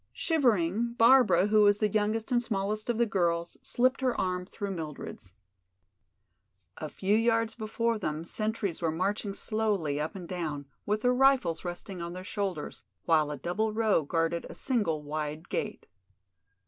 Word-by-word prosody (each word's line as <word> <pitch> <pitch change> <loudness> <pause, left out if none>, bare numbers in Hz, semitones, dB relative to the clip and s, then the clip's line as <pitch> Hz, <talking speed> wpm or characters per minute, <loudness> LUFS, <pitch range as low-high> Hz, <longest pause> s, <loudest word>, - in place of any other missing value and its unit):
Shivering, 235 - +1
Barbara, 230 -7 +6
who 210 +1 +4
was 205 -1 +5
the 215 - +2
youngest 215 +3 0
and 240 -1 +3
smallest 215 -1 -2
of 235 - +1
the 235 - +3
girls, 170 -4 0
slipped 255 +2 +1
her 255 -2 0
arm 180 -1 -1
through 200 0 -5
Mildred's. 150 - -7 1.4
A - - -5
few 200 +2 0
yards 225 0 +2
before 230 0 -1
them 155 -3 -3
sentries 215 -3 -2
were 165 - +1
marching 195 +5 -1
slowly 200 -11 0
up 155 - -4
and 180 -3 -7
down, 155 -6 -4 0.2
with 210 +1 0
their 250 +1 +3
rifles 255 -10 +3
resting 175 +1 -6
on 170 0 -5
their 185 +1 -7
shoulders, 190 - -4 0.2
while 155 -2 +3
a 150 - -4
double 210 +9 -1
row 215 -5 +3
guarded 165 +2 -1
a - - -9
single 195 - 0
wide 150 +1 -4
gate. - - -3
200 Hz, 160 wpm, -29 LUFS, 170-225 Hz, 1.4 s, Barbara